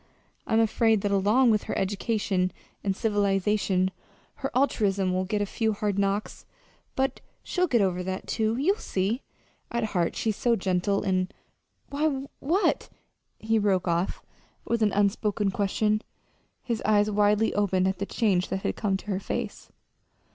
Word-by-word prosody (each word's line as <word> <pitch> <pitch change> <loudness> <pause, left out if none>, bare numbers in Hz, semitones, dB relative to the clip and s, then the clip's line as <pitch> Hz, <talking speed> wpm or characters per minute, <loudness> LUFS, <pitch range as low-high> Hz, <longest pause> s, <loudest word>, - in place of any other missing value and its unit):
I'm 220 - +3
afraid 225 -1 +3
that 205 - -1
along 210 +6 +4
with 215 -1 +1
her - - -3
education 195 -2 0 0.3
and 195 -1 0
civilization 200 -2 +1 0.5
her 270 - -3
altruism 200 -8 +2
will 185 0 0
get 205 +2 0
a - - -1
few 220 +2 -1
hard 205 -1 -1
knocks. 200 +1 -2 0.5
But 265 0 0 0.2
she'll 365 0 0
get 240 -7 +3
over 185 -2 +1
that, 185 +1 -4
too. 220 0 0
You'll 370 +10 +2
see. 200 +7 -1 0.5
At 235 0 -1
heart 175 -3 +1
she's 220 -2 -1
so 240 -1 +2
gentle 190 0 0
and 185 -2 0 0.6
why, 280 -2 0
what" 345 +9 +1 0.5
he 220 0 +1
broke 190 -3 +1
off 170 +2 -1 0.4
with 235 -1 0
an 210 -1 +3
unspoken 205 0 +1
question, 210 +2 +1 0.6
his 235 -3 -2
eyes 210 0 +3
widely 210 +1 +3
opened 190 -2 +2
at 190 -1 -1
the 200 - -2
change 195 -6 +1
that 190 - -3
had - - -1
come 200 -3 0
to - - -14
her 195 -2 -1
face. - - -5
205 Hz, 155 wpm, -27 LUFS, 190-225 Hz, 0.6 s, along